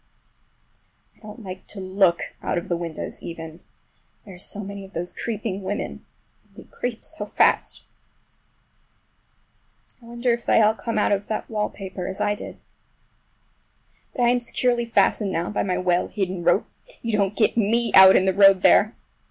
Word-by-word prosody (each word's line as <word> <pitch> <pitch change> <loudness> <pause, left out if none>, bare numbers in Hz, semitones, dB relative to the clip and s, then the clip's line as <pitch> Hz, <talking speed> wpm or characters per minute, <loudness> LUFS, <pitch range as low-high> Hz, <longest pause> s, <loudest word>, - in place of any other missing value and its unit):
I - - -29
don't 215 +1 -11
like 185 -1 -9
to 205 - -8
look 185 -2 +1
out - - -2
of 170 - -4
the 175 - +1
windows 170 -2 -5
even—there 165 +4 -12
are - - -12
so 205 +2 -1
many 200 0 -7
of 195 - -14
those 175 +2 -4
creeping 215 -3 -4
women, 195 +2 -5 0.4
and - - -31
they - - -10
creep 245 -2 -6
so 315 - -6
fast. - - +1 2.2
I - - -17
wonder 240 +1 0
if 235 0 -4
they - - +3
all 215 0 +5
come 225 +1 -4
out 210 - +2
of 200 0 0
that 220 - -4
wallpaper 195 -3 -4
as 190 - -6
I 210 0 +1
did? 205 - -8 1.6
But 245 - 0
I 240 - +4
am 245 0 +2
securely 240 0 0
fastened 215 -3 +1
now 170 +1 -2
by 210 - -1
my 185 -2 -1
well 180 -1 +1
hidden 190 -3 -3
rope—you 225 - -1
don't 200 -1 0
get 215 - +2
me 230 +1 +1
out 190 0 +9
in 190 - +4
the 190 - +2
road 195 -1 +6
there! 215 +3 +5
200 Hz, 170 wpm, -23 LUFS, 185-225 Hz, 2.2 s, out